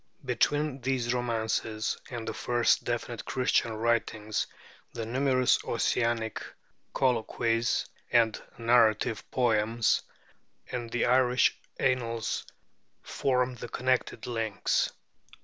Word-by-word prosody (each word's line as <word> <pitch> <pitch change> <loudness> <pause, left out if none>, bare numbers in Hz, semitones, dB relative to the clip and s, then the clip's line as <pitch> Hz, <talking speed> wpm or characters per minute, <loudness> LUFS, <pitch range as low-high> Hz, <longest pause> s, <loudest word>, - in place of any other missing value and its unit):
Between 140 +3 +1
these 125 -2 0
romances 110 -2 -1
and 120 -3 -6
the - - -2
first 120 -1 +2
definite 120 -1 -3
Christian 125 -3 +1
writings 110 -2 0 0.5
the 115 -1 -4
numerous 130 +1 +2
Ossianic 115 -1 0 0.5
colloquies 115 -1 +1 0.3
and 115 -2 +3 0.2
narrative 115 -2 +3
poems, 115 -2 +2 0.7
and 120 -2 -4
the 120 +1 0
Irish 125 0 +4 0.2
Annals, 115 -3 0 0.6
form 125 -1 0
the 120 -1 -8
connecting 125 -2 0
links. 115 -4 0
120 Hz, 95 wpm, -29 LUFS, 115-125 Hz, 0.7 s, Irish